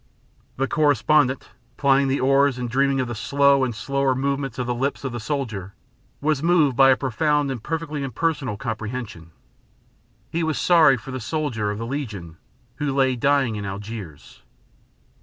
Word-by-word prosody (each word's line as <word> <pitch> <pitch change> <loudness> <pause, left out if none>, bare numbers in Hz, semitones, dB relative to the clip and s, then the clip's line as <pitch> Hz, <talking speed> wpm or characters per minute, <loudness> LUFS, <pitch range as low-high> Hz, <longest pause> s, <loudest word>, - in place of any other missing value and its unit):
The 135 +1 0
correspondent, 145 -2 +2 0.3
plying 140 -1 +3
the 135 +1 0
oars 135 0 +3
and 125 -1 -3
dreaming 135 +2 +1
of 130 - -1
the 120 - -4
slow 140 +5 +3
and 120 -3 -2
slower 135 +2 0
movements 135 -2 -2
of 125 - -2
the 125 - -1
lips 135 +4 -2
of 135 - -3
the 120 - -5
soldier, 110 -7 -4 0.5
was 150 -1 +1
moved 160 -5 +3
by 135 +1 +6
a 130 - +5
profound 145 +2 0
and 125 -4 -5
perfectly 155 0 -4
impersonal 135 -3 -2
comprehension. 110 -6 -5 1.0
He 170 - -1
was 160 -2 -1
sorry 160 -7 +5
for 125 +4 -9
the 130 - -4
soldier 125 -6 -2
of 105 - -3
the 115 - -4
Legion 105 - -5 0.4
who 145 -2 -2
lay 130 -2 +2
dying 135 -2 +1
in 105 - -5
Algiers. 100 -5 -8
135 Hz, 165 wpm, -23 LUFS, 115-140 Hz, 1.0 s, by